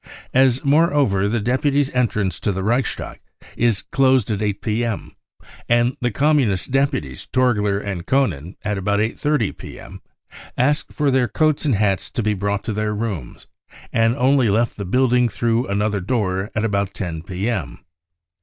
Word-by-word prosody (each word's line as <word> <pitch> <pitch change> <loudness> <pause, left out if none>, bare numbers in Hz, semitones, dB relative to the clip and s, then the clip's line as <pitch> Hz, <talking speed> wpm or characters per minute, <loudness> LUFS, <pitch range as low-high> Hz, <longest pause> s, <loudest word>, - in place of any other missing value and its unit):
As 130 0 +3
moreover 140 - +3
the 120 +2 0
deputies' 135 +5 +1
entrance 105 -6 0
to 105 - 0
the 95 0 -3
Reichstag 120 +3 -1 0.4
is 115 -4 +1
closed 130 -4 +3
at 105 -1 -2
8 105 -2 -1
p.m., 115 0 -2 0.5
and 120 +1 +3
the 125 - +1
Communist 130 - +1
deputies 135 - -1
Torgler 105 -6 +2
and 95 -4 -5
Koenen 95 - 0
at 105 -1 -2
about 100 +1 0
8.30 115 +2 0
p.m. - - -11 0.6
asked 145 +4 +1
for 145 -2 0
their 130 -2 +2
coats 155 +1 +1
and 140 -6 +2
hats 100 -2 0
to 120 - -3
be 105 0 +1
brought 100 0 -2
to 110 - -3
their 105 0 -1
rooms, 105 - -5 0.5
and 115 +1 +3
only 130 -3 +3
left 115 +4 +1
the 100 - -5
building 125 +3 +2
through 115 +3 0
another 105 0 0
door 95 -2 -1
at 110 0 0
about 100 -3 -1
10 85 -5 -4
p.m. 90 - -4
110 Hz, 155 wpm, -21 LUFS, 100-130 Hz, 0.6 s, As